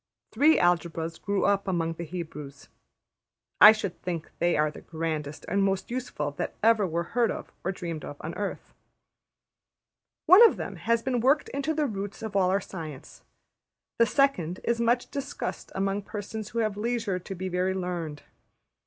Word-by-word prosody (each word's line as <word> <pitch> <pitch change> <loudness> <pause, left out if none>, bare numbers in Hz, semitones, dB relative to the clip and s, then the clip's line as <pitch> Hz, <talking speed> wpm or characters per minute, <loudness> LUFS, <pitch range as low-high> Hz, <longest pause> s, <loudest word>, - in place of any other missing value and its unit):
Three 295 +7 +5
Algebras 165 -2 0
grew 200 -1 0
up 200 -1 +2
among 165 -3 0
the 170 - -6
Hebrews; 150 -4 -8 0.9
I 210 - +12
should 210 -5 -4
think 170 -3 -4
they 175 0 +2
are 150 0 +2
the - - -11
grandest 160 -3 -4
and 200 - +1
most 195 +2 0
useful 240 - -3
that - - -3
ever 220 -3 +4
were 170 0 -1
heard 235 -2 +3
of - - -5
or 190 - 0
dreamed 170 -4 -5
of 145 - -7
on 165 - -5
earth. 205 -1 -5 1.5
One 370 +7 +9
of - - -2
them - - -5
has 230 0 +1
been 255 -2 0
worked 275 +5 +3
into 280 +3 -2
the 305 -1 +1
roots 205 -3 -5
of 215 -2 -5
all 185 -2 +3
our 195 +2 +2
science; 155 -7 -9 0.8
the 230 - +6
second 185 - +1
is 235 0 0
much 240 +1 +1
discussed 280 0 -5
among 195 +1 0
persons 210 +1 -6
who 230 - -3
have 210 -2 -3
leisure 225 -4 -1
to 190 +2 -7
be 185 +1 -4
very 185 +1 0
learned. 175 -5 -4
195 Hz, 170 wpm, -27 LUFS, 170-230 Hz, 1.5 s, I